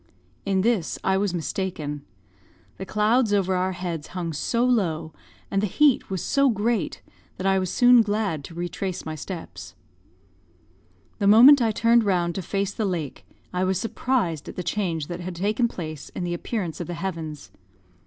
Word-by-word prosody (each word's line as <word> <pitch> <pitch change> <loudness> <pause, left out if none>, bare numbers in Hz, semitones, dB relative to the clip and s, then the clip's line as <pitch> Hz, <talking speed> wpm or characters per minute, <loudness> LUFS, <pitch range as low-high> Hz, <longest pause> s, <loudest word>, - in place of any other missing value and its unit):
In 190 -1 +2
this 215 -6 0
I 190 - +2
was 200 -1 0
mistaken. 160 -4 -3 0.7
The 190 - -7
clouds 215 +2 +2
over 190 -2 +2
our 185 +1 0
heads 175 -4 -5
hung 170 -2 -3
so 235 +10 0
low, 165 -10 0 0.4
and 195 - +1
the 210 - +1
heat 285 +6 +3
was 190 -2 -3
so 275 -1 +3
great, 220 -1 -1 0.3
that 185 - -5
I 195 0 +3
was 185 -1 -2
soon 245 +3 +6
glad 205 -8 -1
to 165 - -11
retrace 175 +2 -4
my 160 - -4
steps. 155 - -8 1.4
The 200 - +2
moment 250 +7 +8
I 230 - +3
turned 230 +2 +3
round 175 -4 +1
to 190 - -3
face 195 +2 -2
the 220 - -2
lake, 165 -7 -4 0.3
I 180 +1 0
was 185 -1 +1
surprised 225 - -1
at - - -9
the 180 - -4
change 170 -4 -1
that 175 +2 -6
had 180 0 -6
taken 215 +7 +1
place 155 -8 -7
in - - -3
the 175 0 -2
appearance 175 -1 -4
of 170 - -5
the 175 - -4
heavens. 165 -4 -5
190 Hz, 175 wpm, -24 LUFS, 170-215 Hz, 1.4 s, moment